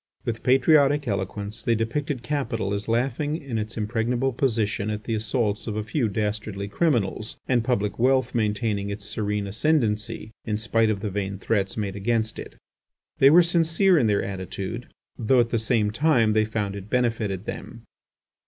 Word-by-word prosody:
With 115 -1 -3
patriotic 140 +2 +4
eloquence 100 +1 -3
they 115 - +2
depicted 120 +4 -2
capital 115 -7 -2
as 100 0 -3
laughing 130 +6 0
in 135 -8 -4
its 110 +2 -5
impregnable 120 +4 0
position 110 -5 0
at 105 0 -3
the 115 - -3
assaults 110 0 -1
of 105 - -3
a 110 - -2
few 115 +1 0
dastardly 105 -1 -3
criminals, 110 - 0
and 125 -3 +2
public 105 -4 -1
wealth 130 0 +2
maintaining 105 -2 0
its 100 0 -6
serene 105 -1 -2
ascendency 110 -2 0
in 105 -2 -1
spite 110 +1 +1
of 100 -2 -1
the 105 -2 -3
vain 100 0 -3
threats 100 0 -1
made 100 -3 -2
against 110 +2 -1
it. - - -9 0.6
They 135 - +8
were 170 +4 +7
sincere 170 +2 +3
in 120 - +2
their 105 -1 +2
attitude, 100 +4 -5 0.3
though 125 +2 +3
at 115 - -1
the 115 - +2
same 110 -2 +1
time 120 -3 +3
they 110 0 +3
found 105 -2 -3
it 100 +1 -8
benefited 115 -6 0
them. 115 -1 -7
110 Hz, 170 wpm, -25 LUFS, 105-125 Hz, 0.6 s, They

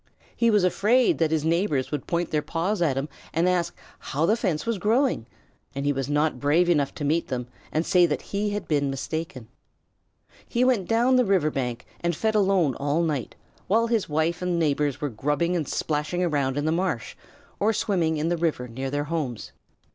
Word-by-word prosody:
He 235 - +3
was 210 -4 +3
afraid 220 +7 +3
that 160 -2 +3
his 160 -1 0
neighbors 165 -5 +1
would 150 -3 -4
point 170 -1 -1
their 150 - +1
paws 170 +7 -2
at 145 -6 +2
him 135 +2 -1 0.3
and 165 +2 +3
ask 175 -2 0 0.2
how 150 +4 -1
the 215 - +3
fence 175 -8 -1
was 230 -3 -1
growing, 225 - +1 0.5
and 140 +1 -3
he 145 - +2
was 135 0 -3
not 150 -2 +1
brave 160 +6 +3
enough 145 -5 +2
to 145 - -4
meet 160 +4 +1
them 125 -2 -3 0.3
and 155 +2 0
say 180 -1 +4
that 150 - -2
he 205 +1 0
had 205 -3 -4
been 145 -2 +1
mistaken. 135 -2 -4 1.0
He 240 0 +1
went 245 -8 +2
down 240 +3 +4
the 250 - +5
river 190 -8 +2
bank 125 -3 -3
and 170 -1 -1
fed 220 +7 0
alone 195 -8 +3
all 145 +4 0
night, 150 -7 -2 0.3
while 225 +4 +3
his 230 -6 0
wife 160 +3 0
and 180 -1 0
neighbors 145 -3 0
were 145 - -1
grubbing 145 +9 0
and 160 -5 -1
splashing 150 +4 -1
around 145 -5 0
in 145 - -1
the 155 - +2
marsh 165 -7 -1 0.4
or 215 +2 +3
swimming 175 -7 0
in 155 +2 0
the 175 - 0
river 160 -7 -1
near 130 +3 -4
their 145 +1 -1
homes. 145 -7 -4
160 Hz, 200 wpm, -25 LUFS, 145-185 Hz, 1.0 s, the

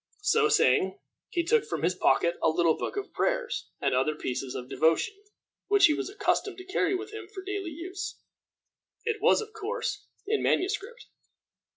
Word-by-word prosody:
So 430 +1 +4
saying, 415 -2 +3 0.3
he 345 - 0
took 455 +6 +3
from 160 -3 -4
his 175 +2 +3
pocket 170 -1 +2
a - - +4
little 160 0 +3
book - - -4
of 405 - -4
prayers - - -1
and - - +1
other 135 +4 +2
pieces 130 -2 -4
of 125 - -5
devotion, 160 - +2 0.5
which 405 -2 +6
he 310 - +5
was 300 - -3
accustomed 400 -1 0
to 370 - -9
carry 380 0 +1
with 405 +3 -5
him 435 -4 -7
for 385 -1 -9
daily 395 -2 -3
use. 365 +5 -6 0.9
It 440 -3 -1
was, 460 +1 +5
of 435 0 -9
course, 450 +2 -3 0.2
in 430 +1 0
manuscript. 410 +5 -1
390 Hz, 175 wpm, -28 LUFS, 265-430 Hz, 0.9 s, which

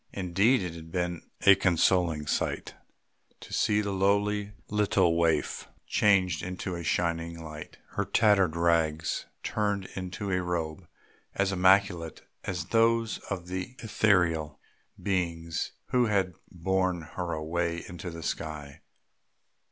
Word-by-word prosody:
Indeed 100 +6 +2
it 90 -2 -4
had 80 -1 -10
been 90 -1 -3 0.2
a 100 - +10
consoling 90 -4 +2
sight - - -2 0.7
to - - -11
see 105 0 +2
the 100 -1 -2
lowly 100 +1 +1
little 100 -5 +2
waif 80 -2 +1 0.2
changed 95 -6 +3
into 90 0 -4
a 85 -1 -5
shining 85 0 -1
light, 75 -1 -9
her - - -1
tattered 100 -6 +3
rags 80 -2 +1 0.2
turned 105 -3 -1
into 95 +2 -4
a 90 0 +1
robe 85 -1 -3 0.5
as 100 0 +1
immaculate 95 -3 +3 0.2
as 90 -3 -3
those 115 0 +2
of 95 -3 -3
the 95 +6 -5
ethereal 85 -9 +1 0.4
beings 85 -4 -2 0.2
who 125 -2 +3
had 95 -3 +1 0.2
borne 95 -1 0
her 90 -2 -3
away 85 +2 -2
into 90 +1 -7
the 85 -1 -8
sky. 75 -3 -5
90 Hz, 125 wpm, -28 LUFS, 85-100 Hz, 0.7 s, a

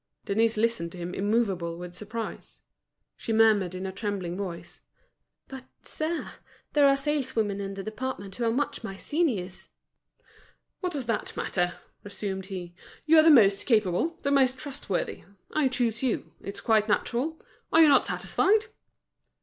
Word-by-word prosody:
Denise 225 +2 +2
listened 220 -6 0
to - - -9
him 175 +1 -5
immovable 195 -5 0
with 175 0 -8
surprise. 215 +5 -7 0.5
She - - -5
murmured 215 -5 +4
in 185 +1 -5
a 190 - -3
trembling 195 -3 -3
voice: 185 -3 -7 0.7
"But, 265 -1 -9 0.2
sir, 315 +2 -3 0.4
there 290 -2 +6
are 275 0 +4
saleswomen 260 -8 -1
in 195 0 -5
the 195 - -5
department 215 -3 -5
who 240 - -2
are 225 - +2
much 270 0 -2
my 195 -3 -6
seniors." 220 - -2 1.1
"What 360 -2 -3
does 275 -4 -3
that 230 -2 -3
matter?" 175 -1 0 0.3
resumed 195 -2 -5
he. 180 -3 -6 0.3
"You 320 +1 +6
are - - +7
the 325 - +7
most 205 -9 +5
capable, 220 - +2
the 280 - +1
most 265 -2 +3
trustworthy. 275 -9 -4 0.3
I 305 -3 +3
choose 240 -3 0
you; 255 -4 -2
it's 200 0 -6
quite 220 -1 +2
natural. 260 +9 0 0.3
Are 325 - +7
you - - +7
not 285 - +5
satisfied?" 425 +2 +2
220 Hz, 155 wpm, -27 LUFS, 195-270 Hz, 1.1 s, are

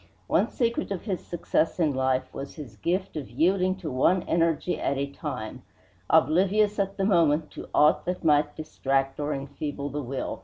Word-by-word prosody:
One - - +2
secret 235 -1 -1
of 195 -3 -4
his 190 -5 -3
success 175 0 -1
in 155 -4 +2
life 130 0 0
was 140 0 -7
his 135 -9 -9
gift 180 - -2
of 150 -4 -5
yielding 185 +8 +2
to 180 -6 -6
one 170 +8 +3
energy 165 0 0
at 140 - 0
a 140 - 0
time, 130 -5 -6 0.5
oblivious 190 +8 +3
at 195 0 -1
the 195 - +1
moment 165 -5 +3
to - - -9
aught 150 +1 +4
that 180 +1 -3
might 150 -2 +3
distract 135 -3 -1
or 145 0 -1
enfeeble 140 +1 -4
the 145 +2 -3
will. 135 0 -4
155 Hz, 180 wpm, -26 LUFS, 140-180 Hz, 0.5 s, aught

